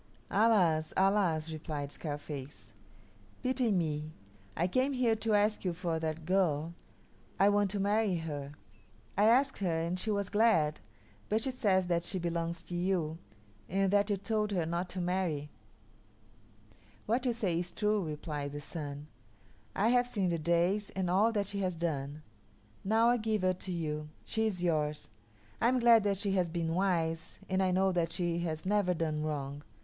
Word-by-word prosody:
"Alas, 185 -8 +3
alas!" 185 -5 +2
replied 150 -2 -5
Scarface, 145 -8 -7 0.7
"Pity 255 -2 +1
me. 155 -4 -1 0.5
I 175 - +2
came 255 +8 +1
here 250 -3 +2
to 220 0 +1
ask 210 +1 +2
you 180 -2 0
for 170 -2 -2
that 160 0 -3
girl. 170 -3 +1 0.7
I 195 - +6
want 205 -1 +2
to 200 +1 -2
marry 205 0 +2
her. 145 -4 -5 0.6
I 205 - +4
asked 265 +5 +4
her 170 -5 0
and 170 +2 -2
she 220 - -2
was 200 -2 -1
glad, 205 -9 +3 0.5
but 215 +1 +2
she 265 - 0
says 200 -7 +2
that 170 -1 +1
she 185 - -2
belongs 170 -1 -2
to 175 - -6
you, 175 -3 -1 0.5
and 195 +1 +1
that 205 +1 +3
you 205 - +1
told 210 +2 -1
her 180 -5 0
not 170 +2 -2
to 185 - -5
marry." 175 -5 -1 1.5
"What 245 +4 0
you - - +3
say 190 -8 0
is 175 0 -3
true," 210 -2 +1
replied 150 -2 -4
the 145 - -4
Sun. 145 -1 -6 0.7
"I 210 +4 +3
have 245 0 +3
seen 200 -6 0
the 170 -1 -1
days 170 +6 +1
and 185 -2 0
all 210 +5 +4
that 205 -2 0
she 200 +1 -4
has 185 -2 -1
done. 155 -3 -3 0.6
Now 225 +4 +4
I 245 - +4
give 215 -3 -1
her 185 0 +3
to 185 +1 -6
you. 150 -3 -3 0.2
She 220 0 0
is 180 -4 -3
yours. 150 -3 0 0.5
I 230 - +4
am 255 +1 +3
glad 235 -2 +6
that 200 -1 +1
she 200 +1 -1
has 185 -3 +1
been 165 -1 -2
wise, 165 -3 0
and 190 0 +1
I 190 - +2
know 190 +1 +2
that 170 -2 0
she 170 -1 -1
has 160 -2 -3
never 195 -2 +2
done 155 -2 -1
wrong. 145 -2 -3
180 Hz, 175 wpm, -32 LUFS, 160-205 Hz, 1.5 s, I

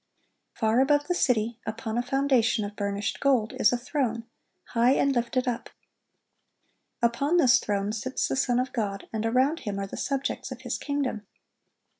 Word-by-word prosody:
Far 220 +1 +2
above 290 +2 +3
the 355 - +1
city, 235 -7 +1
upon 220 0 -4
a 240 - +2
foundation 250 -4 +2
of 205 0 -7
burnished 200 0 -2
gold, 255 -6 +2
is 210 - +5
a 245 - +1
throne, 240 -3 -2 0.5
high 240 +2 +3
and 275 0 +2
lifted 245 +2 0
up. 240 -2 -2 1.3
Upon 280 +8 +2
this 255 -6 +6
throne 205 -2 -1
sits 240 +4 -2
the - - -1
Son 250 -2 +1
of 255 +1 -2
God, 200 -5 -3
and 220 0 -1
around 260 +7 +2
Him 205 -7 -4
are 200 - -2
the 195 - -8
subjects 275 -1 -2
of - - -7
His - - -3
kingdom. 270 -8 -2
240 Hz, 170 wpm, -27 LUFS, 220-270 Hz, 1.3 s, this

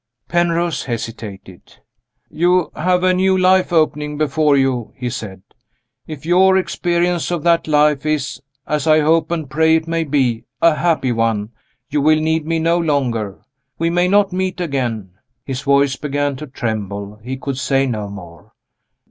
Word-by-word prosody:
Penrose 170 -2 0
hesitated. 110 -6 -7 0.6
"You 175 +1 +2
have 180 +2 +1
a 185 0 +4
new 190 +1 +2
life 185 0 +3
opening 150 -2 0
before 150 -1 +2
you," 130 -4 0
he 125 -2 -4
said. 100 -6 -7 0.6
"If 155 -2 -8
your 190 +2 +4
experience 175 -2 0
of 175 -4 -2
that 170 -1 +2
life 150 -2 +3
is 155 -3 -2 0.2
as 150 0 -2
I 155 0 +5
hope 160 +1 +2
and 165 -3 -3
pray 160 +3 +3
it 160 0 -1
may 165 0 0
be 130 -6 0
a 165 -1 +5
happy 155 -5 0
one, 115 -2 -1 0.4
you 145 0 +1
will 155 +2 +4
need 160 0 0
me 165 0 0
no 165 +2 +1
longer; 125 - -1 0.4
we 165 +1 0
may 175 +1 +2
not 200 0 +3
meet 185 0 -2
again." 125 - -3 0.3
His 135 -1 -4
voice 140 -1 +2
began 145 -1 -2
to 150 - -8
tremble; 105 -5 -5
he 130 +2 -5
could 135 0 -4
say 135 0 +1
no 110 -5 -3
more. 85 -5 -12
150 Hz, 160 wpm, -18 LUFS, 125-170 Hz, 0.6 s, I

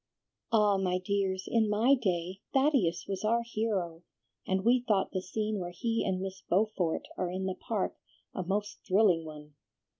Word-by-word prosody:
"Ah, 210 -3 +4
my 185 -1 +1
dears, 190 0 -1
in 225 -2 +2
my 225 +6 +4
day, 185 -6 -1
Thaddeus 265 - +2
was 195 0 -3
our 230 +2 +2
hero, 205 -8 -2 0.5
and 190 +1 0
we 245 +2 +5
thought 200 -3 +2
the 185 - -2
scene 210 +3 -2
where 175 -1 -4
he 230 +5 -1
and 190 -1 0
Miss 190 0 -5
Beaufort 185 -4 0 0.2
are 180 - 0
in 185 +1 -3
the 190 - -1
Park 200 +1 -3 0.4
a - - -3
most 205 +3 -2
thrilling 185 -5 +3
one. 150 -1 -10
195 Hz, 170 wpm, -30 LUFS, 185-215 Hz, 0.5 s, we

